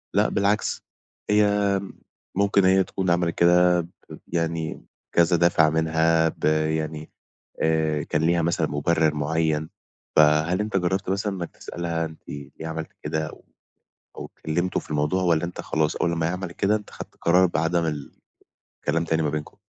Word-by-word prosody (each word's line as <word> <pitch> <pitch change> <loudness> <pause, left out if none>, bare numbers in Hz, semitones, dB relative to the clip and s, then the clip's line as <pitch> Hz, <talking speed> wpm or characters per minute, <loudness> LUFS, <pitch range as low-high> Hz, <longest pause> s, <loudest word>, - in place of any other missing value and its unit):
لأ، - - +3
بالعكس، 100 +2 0 0.5
هي 105 -1 +3 0.6
ممكن 100 -1 +3
هي 95 +1 +5
تكون 95 0 -3
عملت 85 -1 +1
كده، 90 0 +4 0.4
يعني، 85 -1 -3 0.3
كذا 85 +1 +4
دافع 85 -2 +4
منها 80 +1 +2
ب - - -5
يعني، 80 0 0 0.5
آآ، 80 -2 +1
كان 75 - -1
ليها 85 +1 +2
مثلًا 85 +1 +1
مبرِّر 80 +1 +1
معيَّن. 80 +1 0 0.5
فهل 75 +4 +4
أنت 105 -1 -1
جرَّبت 95 +1 0
مثلًا 100 +1 -1
إنك 85 -2 -5
تسألها: 85 -1 -3
"أنت 80 0 -10
ليه 70 -1 -8 0.2
عملتِ 80 0 -5
كده؟" 80 +1 -2
أو - - -14 0.7
أو - - -7
اتكلَّمتوا 85 +4 -1
في - - -17
الموضوع، 75 +5 0
والّا 85 -2 +2
أنت 85 - -5
خلاص 80 -1 -1
أول 85 - +1
ما 80 -1 0
هي - - -2
عملت 90 -1 -5
كده، 100 +4 +1
أنت 105 -1 -9
خدت - - -10
قرار 90 +2 +4
بعدم 85 0 0
ال 75 -3 -4 0.7
الكلام 80 +1 +1
تاني 80 0 0
ما 75 - +1
بينكم؟ 75 +4 -5
80 Hz, 160 wpm, -24 LUFS, 80-90 Hz, 0.7 s, هي